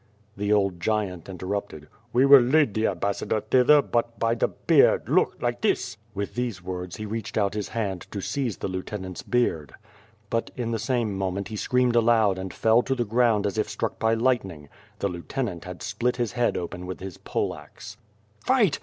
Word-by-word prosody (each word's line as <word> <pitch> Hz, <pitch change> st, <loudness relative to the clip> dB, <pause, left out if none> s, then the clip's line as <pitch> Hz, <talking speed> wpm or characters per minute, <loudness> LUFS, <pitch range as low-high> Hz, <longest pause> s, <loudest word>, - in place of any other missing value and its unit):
The 105 Hz, +1 st, -1 dB
old 100 Hz, -4 st, +2 dB
giant 95 Hz, -2 st, -2 dB
interrupted. 95 Hz, -4 st, -5 dB, 0.2 s
"We 125 Hz, +3 st, +4 dB
will 140 Hz, 0 st, +10 dB
lead 135 Hz, -1 st, +3 dB
the 110 Hz, +1 st, +1 dB
ambassador 100 Hz, +3 st, -1 dB
thither, 130 Hz, +7 st, +5 dB
but 115 Hz, 0 st, -1 dB
by 115 Hz, 0 st, +1 dB
the 120 Hz, -, +1 dB
beard, -, -, +3 dB
look, -, -, +2 dB
like -, -, -2 dB
this!" -, -, 0 dB, 0.2 s
With 100 Hz, +1 st, -3 dB
these 120 Hz, -5 st, -2 dB
words, 90 Hz, -1 st, -5 dB
he 110 Hz, -, -6 dB
reached 110 Hz, +1 st, -4 dB
out 100 Hz, -2 st, +1 dB
his 105 Hz, -1 st, -3 dB
hand 100 Hz, -6 st, -3 dB
to 100 Hz, -, -5 dB
seize 120 Hz, -, -2 dB
the -, -, -3 dB
lieu 95 Hz, -1 st, -3 dB
tenant's 95 Hz, -3 st, -6 dB
beard. 85 Hz, -, -1 dB, 0.6 s
But 115 Hz, 0 st, 0 dB
in 120 Hz, -2 st, -3 dB
the 115 Hz, -, -1 dB
same 120 Hz, -6 st, -1 dB
moment, 95 Hz, +1 st, -2 dB
he 110 Hz, -, -5 dB
screamed 125 Hz, +2 st, +1 dB
aloud 110 Hz, -4 st, +4 dB
and 95 Hz, 0 st, -5 dB
fell 115 Hz, +2 st, +3 dB
to 135 Hz, +2 st, -1 dB
the 120 Hz, -2 st, -1 dB
ground 115 Hz, -1 st, +2 dB
as 100 Hz, +2 st, -1 dB
if 110 Hz, -, 0 dB
struck -, -, -3 dB
by 110 Hz, 0 st, +2 dB
lierhtning. 95 Hz, -, -1 dB, 0.3 s
The -, -, -1 dB
lieutenant 90 Hz, -, -4 dB
had 90 Hz, -2 st, -8 dB
split 115 Hz, +4 st, -1 dB
his 120 Hz, -3 st, -1 dB
head 120 Hz, -1 st, 0 dB
open 90 Hz, +1 st, -5 dB
with 90 Hz, -, -6 dB
his 95 Hz, -2 st, -7 dB
poleaxe. 105 Hz, +3 st, -5 dB, 0.5 s
"Fight! 235 Hz, -, +3 dB
105 Hz, 190 wpm, -25 LUFS, 95-120 Hz, 0.6 s, will